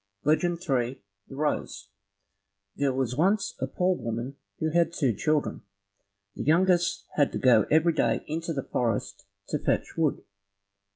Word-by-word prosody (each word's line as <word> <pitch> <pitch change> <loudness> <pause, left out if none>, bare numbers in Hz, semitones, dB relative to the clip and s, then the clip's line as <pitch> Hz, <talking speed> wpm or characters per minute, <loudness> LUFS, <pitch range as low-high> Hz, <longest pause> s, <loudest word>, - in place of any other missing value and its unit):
Legend 170 +3 +2
3 130 -6 -1 0.3
The 135 - -10
Rose 145 -8 -2 0.9
There 140 -1 +1
was 130 -2 -1
once 195 +7 +2
a 130 - -1
poor 180 +7 +1
woman 115 +2 -4 0.2
who 160 0 -1
had 170 +1 +3
two 135 -8 +1
children. 150 +8 0 0.7
The - - -5
youngest 175 +3 +2
had 145 -2 +3
to - - -1
go 120 -5 +4
every 160 +2 +4
day - - +1
into 165 +2 -3
the 135 -4 -2
forest 105 -5 -2 0.2
to - - -1
fetch - - 0
wood. 160 -4 0
150 Hz, 150 wpm, -27 LUFS, 130-170 Hz, 0.9 s, go